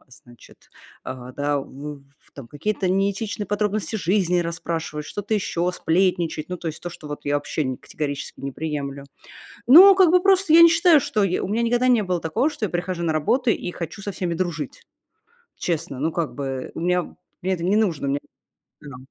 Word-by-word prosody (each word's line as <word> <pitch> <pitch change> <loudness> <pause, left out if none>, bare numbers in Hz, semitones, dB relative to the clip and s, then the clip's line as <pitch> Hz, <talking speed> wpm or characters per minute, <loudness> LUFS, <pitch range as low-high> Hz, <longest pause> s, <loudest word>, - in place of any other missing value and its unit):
значит, 120 -1 -18 0.3
а, 125 0 -7
да, 145 +1 -1
в 145 +2 -9 0.2
в - - -26
там 140 -4 -10
какие-то 190 +6 -2
неэтичные 200 +3 -1
подробности 210 +2 -1
жизни 185 -2 +1
расспрашивать, 165 -2 -4
что-то 205 +2 -3
еще, 180 -3 -1
сплетничать. 175 -3 0
Ну, 180 - -4
то 170 -1 -5
есть 160 - -7
то, 175 - -4
что 160 -2 -11
вот 145 - -7
я 145 0 0
вообще 150 +1 -1
не 130 -1 -2
категорически 145 -2 -6
не 140 0 -5
приемлю. 140 -2 -4 0.6
Ну, 370 +8 +10
как 375 -4 +5
бы 360 0 +5
просто 385 -3 +3
я 335 - +9
не 335 - +10
считаю, 335 -1 +5
что, 215 -5 0
я 185 -2 0
у - - -2
меня 215 +4 0
никогда 245 +2 +2
не 240 -4 +4
было 180 -2 -1
такого, 165 - 0
что 230 - -3
я - - -4
прихожу 175 0 -3
на 165 -2 0
работу 240 - +1
и 175 - -3
хочу 170 +3 -7
со 205 - -3
всеми 180 -2 -3
дружить. 165 -5 -4 0.7
Честно, 155 -6 -3
ну, 160 +4 0
как 165 -2 -2
бы 135 -2 -4
у - - -5
меня 180 0 0 0.3
мне 190 +2 0
это 170 -2 -4
не 190 +3 +2
нужно, 170 -10 0
мне 140 +1 0 0.6
да. 140 -3 -10
175 Hz, 200 wpm, -23 LUFS, 150-210 Hz, 0.7 s, Ну